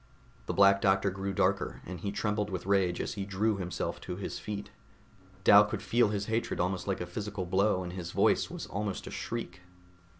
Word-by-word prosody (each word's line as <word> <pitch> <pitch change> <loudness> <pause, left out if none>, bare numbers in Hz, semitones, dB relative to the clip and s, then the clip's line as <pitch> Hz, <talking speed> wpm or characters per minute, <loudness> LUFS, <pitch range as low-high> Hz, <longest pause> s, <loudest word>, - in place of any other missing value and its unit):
The - - -1
Black 100 0 +6
Doctor 95 0 +3
grew 95 +1 -3
darker, 95 - 0
and 90 -1 -6
he 100 +3 -3
trembled 105 0 -1
with 95 -2 -4
rage 95 -3 +2
as - - -2
he 100 - -4
drew 100 +2 0
himself 90 -2 -3
to 90 - -5
his 95 - -5
feet. 105 -1 -6 0.7
Dal 100 +2 +9
could 105 - -4
feel 120 -2 +3
his 105 -1 -2
hatred 115 +2 -1
almost 90 +1 -1
like 95 -2 -1
a - - -2
physical 100 +1 -4
blow 95 +1 +2
and 90 0 -6
his 90 -2 -5
voice - - +3
was - - -6
almost 100 -1 -3
a - - -7
shriek. 90 -6 -5
100 Hz, 200 wpm, -30 LUFS, 90-105 Hz, 0.7 s, Dal